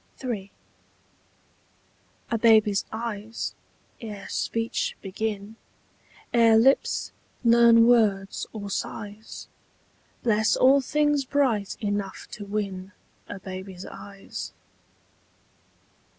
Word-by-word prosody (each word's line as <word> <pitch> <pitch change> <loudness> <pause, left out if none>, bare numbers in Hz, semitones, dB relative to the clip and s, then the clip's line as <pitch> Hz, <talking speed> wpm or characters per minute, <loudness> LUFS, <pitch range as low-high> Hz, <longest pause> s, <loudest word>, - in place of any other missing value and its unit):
III. 210 -6 -4 1.8
A 230 - +2
baby's 215 -3 +4
eyes, 220 -1 -4 0.5
ere 210 -4 -7
speech 230 0 -2
begin, 205 +2 -4 0.8
Ere 230 -2 +6
lips 265 +5 +3 0.3
learn 235 -1 +6
words 210 -5 +2
or 205 -2 -6
sighs, 210 +2 -6 0.8
Bless 220 -1 +3
all 270 +2 +5
things 295 +1 +1
bright 255 -7 0
enough 205 -2 -3
to 210 - -7
win 200 -2 -4 0.4
A 205 - -5
baby's 190 -1 -8
eyes. 200 -1 -8
220 Hz, 85 wpm, -26 LUFS, 200-235 Hz, 1.8 s, Ere